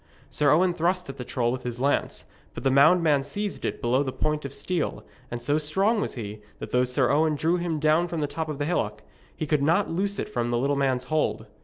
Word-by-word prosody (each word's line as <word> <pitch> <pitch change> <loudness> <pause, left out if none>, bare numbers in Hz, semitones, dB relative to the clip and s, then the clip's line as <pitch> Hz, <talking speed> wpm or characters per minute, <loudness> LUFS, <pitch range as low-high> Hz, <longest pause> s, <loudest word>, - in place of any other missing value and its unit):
Sir 145 -1 +3
Owen 175 +5 +4
thrust 180 0 0
at 135 - -7
the 125 - -5
troll 120 -3 -1
with 130 +1 -3
his 125 -1 -5
lance; 140 +2 0 0.3
but - - -6
the 135 - +3
moundman 150 +1 +5
seized 200 +9 -4
it - - -3
below 125 +3 +2
the 135 -2 -2
point 150 +2 -2
of 140 - -5
steel, 175 +3 -3 0.3
and 120 - -4
so 145 +5 +1
strong 195 +9 +1
was - - -3
he, 105 -3 -6 0.2
that - - -8
though 125 0 +3
Sir 125 0 +2
Owen 155 +1 +3
drew 165 +4 +1
him 170 -2 -2
down 155 +3 +3
from 170 -1 -4
the 150 - +1
top 155 +2 -4
of 150 - -4
the 145 - -1
hillock, 110 -10 -2 0.3
he - - -3
could 150 -1 +1
not 165 +7 +2
loose 200 +4 -1
it - - -3
from 120 - -2
the 120 - +1
little 140 +4 +1
man's 135 -2 +1
hold. 155 +4 -1
150 Hz, 240 wpm, -26 LUFS, 130-170 Hz, 0.3 s, moundman